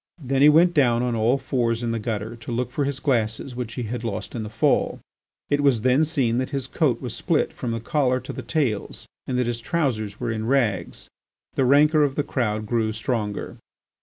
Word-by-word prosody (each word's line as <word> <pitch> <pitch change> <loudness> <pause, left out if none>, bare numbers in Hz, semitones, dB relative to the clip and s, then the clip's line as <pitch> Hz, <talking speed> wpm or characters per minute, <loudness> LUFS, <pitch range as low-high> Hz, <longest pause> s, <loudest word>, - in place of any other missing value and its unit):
Then 135 -4 -1
he 145 - +8
went 170 +3 +5
down 120 -6 +3
on 125 -1 0
all 115 +4 +2
fours 120 -3 -1
in 115 - -1
the 115 - -1
gutter 110 +1 -3
to 115 +1 -8
look 120 +1 -2
for 140 +2 -1
his 140 -1 -3
glasses 120 -2 -1
which 120 -2 -5
he 125 - -3
had 120 +2 -4
lost 115 -4 -4
in 115 - -3
his 105 - -7
fall. 110 - +1 0.5
It 145 0 +3
was 135 -6 +3
then 130 +6 +3
seen 130 -7 +1
that 130 - -2
his 135 -3 -3
coat - - 0
was - - -4
split - - 0
from 125 - -5
the 115 0 -2
collar 130 +1 +1
to - - -7
the - - -5
tails 130 -11 -2 0.2
and 125 - -1
that 125 - +1
his 120 0 -3
trousers 115 - -1
were 120 -2 -2
in 110 0 -3
rags. 115 -10 0 0.5
The 135 - +1
rancour 150 +4 +5
of 140 -2 +1
the 145 - 0
crowd 110 -6 -1
grew 110 0 0
stronger. 110 -2 -3
125 Hz, 220 wpm, -24 LUFS, 115-135 Hz, 0.5 s, he